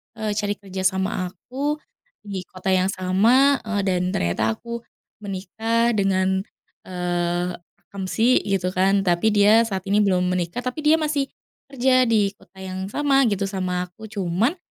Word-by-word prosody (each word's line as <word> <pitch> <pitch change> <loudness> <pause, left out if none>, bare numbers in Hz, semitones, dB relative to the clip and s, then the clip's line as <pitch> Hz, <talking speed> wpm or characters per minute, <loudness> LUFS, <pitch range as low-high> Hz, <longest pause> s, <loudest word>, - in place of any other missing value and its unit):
eee, 220 -1 -2
cari 205 0 -1
kerja 190 -2 -7
sama 190 -1 -1
aku, 270 - -3 0.5
di 195 -3 -5
kota 185 +1 -3
yang 185 0 +3
sama, 230 +10 +3
eee, 210 -2 -1
dan 185 -2 +1
ternyata 100 +6 0
aku 235 0 -6 0.4
menikah 220 +4 -1
dengan, 190 -1 +1 0.4
eee, 175 0 -1 0.4
akamsi 200 +5 +2
gitu 190 -2 0
kan, 195 +2 +2
tapi 180 +4 +2
dia 210 +3 +6
saat 190 -3 -3
ini 205 - +3
belum 190 -3 +3
menikah 180 +6 -2
tapi 255 +4 -3
dia 310 +1 +6
masih, 295 -3 0 0.4
kerja 255 -1 +3
di 205 -3 +2
kota 195 - -24
yang 190 +1 -5
sama 275 +3 +2
gitu 200 -1 -1
sama 185 -2 -2
aku. 210 +5 -12
Cuman, 205 - 0
195 Hz, 150 wpm, -23 LUFS, 185-225 Hz, 0.5 s, dia